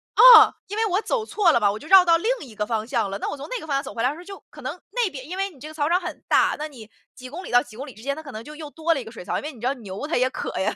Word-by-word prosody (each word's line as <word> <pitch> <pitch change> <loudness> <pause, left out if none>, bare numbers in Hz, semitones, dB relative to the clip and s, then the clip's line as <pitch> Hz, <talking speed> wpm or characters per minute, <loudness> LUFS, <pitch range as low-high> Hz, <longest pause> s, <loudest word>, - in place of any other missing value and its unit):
嗯， - - +9
因 415 +2 -6
为 445 - +2
我 385 +3 0
走 450 -2 -2
错 400 -6 +3
了 235 - +3
嘛， 205 -2 +3
我 210 - -5
就 305 - -12
绕 380 0 +8
到 335 -1 +5
另 435 +8 -2 0.2
一 225 - -14
个 210 0 -2
方 220 -1 -2
向 225 -5 -1
了。 200 - -4
那 - - -3
我 - - -5
从 275 - -8
那 - - -3
个 315 - -10
方 280 - -1
向 275 - 0
走 - - -8
回 230 - -3
来 250 - +3
的 295 - -5
时 - - -12
候 355 - -10
就 395 +1 -10
可 - - -13
能 - - -6
那 480 -5 0
边 265 -2 -9
因 370 - -5
为 390 +1 -1
你 290 -8 -19
这 300 - -9
个 310 - -10
草 300 0 -1
场 355 +2 +3
很 350 - -7
大， - - +3
那 305 - -3
你 235 -7 -13 0.3
几 255 0 -10
公 355 +7 -8
里 - - -9
到 245 - +5
几 225 -5 -15
公 270 - -6
里 260 - -10
之 220 - -15
间 280 0 -2
它 315 - -9
可 280 - -9
能 220 +1 -8
就 300 +3 -11
又 305 -1 -8
多 330 +1 0
了 275 - -3
一 - - -8
个 225 - -11
水 225 - -10
槽。 - - -2
因 - - -5
为 305 - -5
你 235 - -15
知 245 - -1
道 270 - +1
牛 210 +3 -7
它 335 - -1
也 255 +1 +2
渴 - - -5
呀， 190 - -1
290 Hz, 430 characters per minute, -23 LUFS, 240-350 Hz, 0.3 s, 嗯